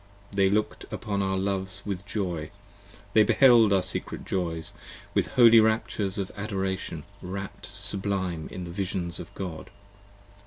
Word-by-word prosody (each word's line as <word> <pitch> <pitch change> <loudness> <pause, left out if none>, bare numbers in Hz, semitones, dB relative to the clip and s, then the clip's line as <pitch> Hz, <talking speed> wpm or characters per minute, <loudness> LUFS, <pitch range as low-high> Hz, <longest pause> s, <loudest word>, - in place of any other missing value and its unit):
They 100 -1 +3
looked 105 +2 0
upon 100 -2 -2
our 95 0 0
loves 95 -1 -2
with 100 -1 -4
joy: 90 -7 -2 0.6
they 110 - +7
beheld 115 -1 +6
our 95 -2 +4
secret 95 - -2
joys: 85 -3 -2 0.4
With - - +2
holy 115 -2 +7
raptures 110 -3 +1
of 100 -2 -3
adoration 95 -5 -3 0.2
rap'd 95 +2 -6
sublime 100 -4 -2
in 90 - -5
the 85 - -7
visions 90 -2 -3
of - - -8
God. 90 -5 -6
95 Hz, 140 wpm, -27 LUFS, 90-100 Hz, 0.6 s, they